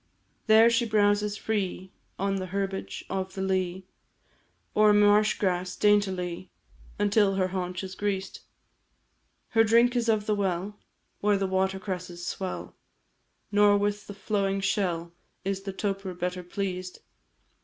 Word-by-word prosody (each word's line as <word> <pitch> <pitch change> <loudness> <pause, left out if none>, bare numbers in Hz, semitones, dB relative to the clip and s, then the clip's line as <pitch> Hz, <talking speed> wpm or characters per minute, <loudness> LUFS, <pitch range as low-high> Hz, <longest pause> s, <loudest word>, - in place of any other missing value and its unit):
There 220 +1 +7
she 235 0 +2
browses 205 -1 +2
free 190 -4 -3 0.3
On 195 +1 0
herbage 195 +1 -4
of 190 0 -4
the 190 - -2
lea, 185 -1 -1 0.9
Or 210 0 +5
marsh 205 +1 +5
grass, 180 -2 -1
daintily, 185 -4 +1 0.5
Until 205 -1 +3
her 185 -1 +1
haunch 180 0 -3
is 190 0 -6
greased. 195 -1 -3 1.1
Her 225 -1 +4
drink 235 +3 +4
is 235 -1 +1
of 215 -2 +2
the 215 - +1
well, 195 0 -1 0.4
Where 205 0 +2
the 195 - 0
water 190 0 0
cresses 180 -2 -6
swell, 185 +1 -5 0.8
Nor 205 0 +5
with 205 0 -1
the 205 - -8
flowing 195 -1 -1
shell 175 -4 -1 0.3
Is 195 0 -1
the 195 0 -5
toper 195 -1 -3
better 180 +1 -3
pleased. 185 0 -5
195 Hz, 135 wpm, -27 LUFS, 185-205 Hz, 1.1 s, There